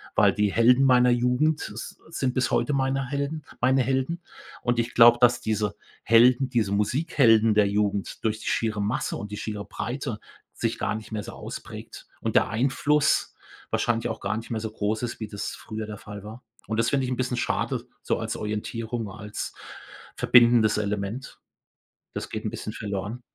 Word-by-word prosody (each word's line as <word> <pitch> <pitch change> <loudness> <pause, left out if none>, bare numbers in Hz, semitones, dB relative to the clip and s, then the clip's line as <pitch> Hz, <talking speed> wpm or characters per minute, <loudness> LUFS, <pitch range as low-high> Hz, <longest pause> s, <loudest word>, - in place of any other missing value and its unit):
weil - - +5
die 105 -1 +1
Helden 125 +3 +5
meiner 125 -1 +5
Jugend 125 +6 +1
s - - -8
sind 130 -6 -1
bis 130 -1 0
heute 120 +4 +1
meine 135 0 0
Helden 140 +2 -3 0.2
meine 130 +1 +4
Helden 135 +7 -1 0.4
und 120 -1 +1
ich 115 +1 -1
glaube, 120 0 +8
dass 120 0 +5
diese 105 -1 -1 0.3
Helden, 125 +3 +5
diese 110 -5 0
Musikhelden 115 - +3
der 105 -1 +4
Jugend 100 -1 -1
durch 110 0 0
die - - -8
schiere 110 -2 0
Masse 105 +3 -1
und 105 0 -7
die 105 - -5
schiere 105 -2 -4
Breite 120 +1 -4 0.3
sich - - -2
gar - - -1
nicht 110 0 -8
mehr 105 -1 -2
so - - -8
ausprägt - - -9
und - - -3
der - - +4
Einfluss 140 +6 +2 0.4
wahrscheinlich 115 -1 0
auch - - -4
gar 100 +2 -2
nicht 115 +1 -6
mehr 110 - -1
so 110 0 -4
groß 110 +1 -2
ist, 120 -2 -4
wie 110 - -3
das 100 - -4
früher 110 -1 -6
der 105 -1 -7
Fall 105 0 -9
war 110 +4 -10 0.2
und 110 - -2
das 115 - +3
finde 135 -2 +1
ich - - -3
'n - - 0
bisschen 125 -1 -1
schade, - - -1 0.2
so - - 0
als - - -3
Orientierung, 110 +1 -4
als 105 0 -6 0.6
verbindendes 120 -3 +5
Element. 105 +4 -3 0.8
Das - - -4
geht 110 0 -5
'n 110 - -1
bisschen 110 -1 -6
verloren. 105 +3 -4
115 Hz, 185 wpm, -26 LUFS, 105-125 Hz, 0.8 s, glaube